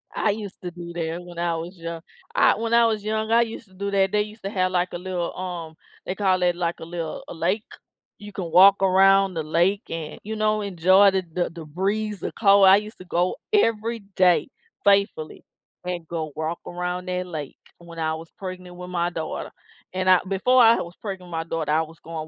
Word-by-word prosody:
I 210 - +2
used 205 -2 -7
to 180 - -5
do 170 0 -9
that 165 0 -3
when 175 -1 -10
I 170 -1 0
was 170 +3 -6
young. 165 0 -6 0.3
I - - +5
when 230 +1 -2
I 235 0 +6
was 215 -2 0
young, 220 +1 -2
I 235 - +6
used 225 -1 -4
to 190 - -23
do 200 +2 -4
that, 195 -1 +2
they 210 - +2
used 215 +2 -8
to 195 - -3
have, 185 -2 0
like, 180 0 +1
a - - -2
little, 180 -1 -4
um 175 -3 -5 0.3
they 185 - -3
call 190 -3 +1
it, 175 -1 +2
like, 170 -1 -2
a - - -7
little 165 -2 -5
a - - -7
lake, 180 +6 -1 0.5
you 205 0 -10
can 175 -4 -5
walk 195 +2 +7
around 195 0 +5
the 160 -2 -3
lake 175 +7 +1
and, 165 -2 -6
you 220 +2 -5
know, 215 0 +1
enjoy 190 +1 +5
the 190 -1 0
the 175 0 0
the 165 -2 -10
breeze, 200 +6 -2
the - - -4
cold, 200 -2 +5
I 190 +1 +8
used 210 +2 -6
to 185 - -11
go 175 +1 0 0.2
every 230 - +2 0.2
day 185 +5 +4 0.3
faithfully, 200 -6 +1 0.4
and 175 -2 -4
go 160 -2 -4
walk 160 +2 -3
around 180 +1 -4
that 180 0 -2
lake 155 -5 -6 0.2
when 170 -1 -11
I 160 0 0
was 165 +1 -10
pregnant 185 -2 -8
with 180 0 -8
my 175 -1 0
daughter, 160 -2 -5 0.4
and 185 0 0
I 185 - +7
before 250 +7 +3
I 230 0 +7
was 170 +1 -6
pregnant 190 -4 -6
with - - -13
my 165 0 -1
daughter, 165 -2 -3
I 160 +1 +3
was 160 0 -8
going 160 -1 -7
185 Hz, 225 wpm, -24 LUFS, 170-200 Hz, 0.5 s, I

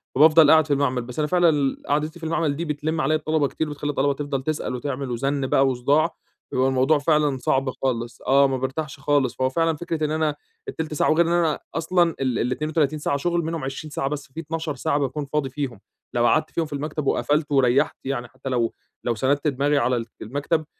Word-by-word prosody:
فبافضل 155 +2 +7
قاعد 160 -1 +5
في 145 - +2
المعمل 130 -3 +1
بس 120 +4 -7
أنا 150 - +1
فعلًا 175 +1 +4
ال 140 -3 0
قعدتي 150 +3 -1
في 165 - -7
المعمل 160 -2 0
دي 170 +4 -3
بتلم 155 +1 -2
عليّا 155 +3 +2
الطلبة 155 -1 +1
كتير، 160 +2 -3
بتخلي 145 0 -4
الطلبة 140 -1 +1
تفضل 140 -1 -3
تسأل 155 -3 -2
وتعمل 130 0 -4
وزن 135 +2 -1
بقى 135 +1 +3
وصداع، 140 +6 +1 0.4
فبيبقى 130 +1 +2
الموضوع 135 +3 +3
فعلًا 150 -2 +2
صعب 135 +1 0
خالص، 120 -2 -3
آه، 140 +1 +4
ما 135 - -1
بارتاحش 140 +3 -4
خالص. 140 -3 +1
فهو 130 0 +1
فعلًا 165 +3 +1
فكرة 160 0 -2
إن 150 - -2
أنا 155 -1 0 0.3
ال1/3 160 -1 -4
ساعة 150 - +1
وغير 165 +1 +3
إن - - 0
أنا 170 -3 +2 0.2
أصلًا 170 +1 +2
ال 130 -3 0
ال32 150 +4 0
ساعة 140 - 0
شغل 170 +4 0
منهم 165 -1 -3
20 135 +3 -5
ساعة 135 - -2
بس 145 -1 -5
في 160 - -6
12 160 -1 -4
ساعة 140 +2 0
باكون 140 +2 -2
فاضي 140 -1 -1
فيهم، 130 -5 -4 0.3
لو 120 0 +2
قعدت 155 +5 +2
فيهم 165 - -1
في 150 - -9
المكتب 150 +1 -3
وقفلت 150 +2 +1
وريحت 135 -2 +3
يعني 130 -3 -3
حتى 130 +2 -8
لو 120 -3 0 0.3
لو 120 - 0
سندت 140 +6 +1
دماغي 145 +1 +1
على 120 -2 +1 0.2
المكتب 145 +7 -1
145 Hz, 210 wpm, -23 LUFS, 135-155 Hz, 0.4 s, فبافضل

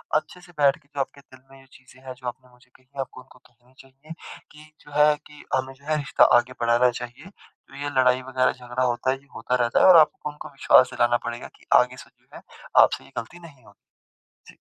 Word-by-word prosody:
अच्छे 155 +4 -3
से 180 - -17
बैठ 140 -1 +4
के 150 -3 -30
जो 145 -1 -9
आपके 140 +1 -6
दिल 130 -1 -19
में 135 - -16
जो - - -21
चीज़ें 130 0 -19
हैं 130 - -6
जो 125 0 -9
आपने 125 +1 -8
मुझे 125 0 -25
कही 130 +1 -17
आपको 130 -1 -9
उनको - - -21
कहनी 125 +1 -28
चाहिए 135 +4 -14 0.4
कि 150 0 -15 0.2
जो 145 - -15
है 150 0 +5
कि 150 0 -15
हमें 130 0 -3
जो 140 +2 -23
है 155 - +1
रिश्ता 140 -2 +2
आगे 120 +1 -1
बढ़ाना 120 +1 +3
चाहिए। 120 +8 -9
तो 200 - -23
ये 145 - -2
लड़ाई 125 0 +3
वग़ैरह 130 0 0
झगड़ा 125 0 -4
होता 125 +1 0
है 135 - -2
ये 140 +1 -25
होता 120 +2 -2
रहता 120 - +1
है - - +5
और 180 -2 +9
आप 155 - +6
उनको 150 0 -7
विश्वास 135 -2 +4
दिलाना 120 0 +2
पड़ेगा 120 +1 -6
कि - - -24 0.2
आगे 125 +1 -5
से - - -23
जो - - -36
है - - -11 0.4
आपसे - - -1
ये - - -19
गलती 145 +10 -7
नहीं 145 -8 -16
होगी। 100 -1 -24 0.6
जी। - - -25
130 Hz, 235 wpm, -24 LUFS, 125-145 Hz, 0.6 s, और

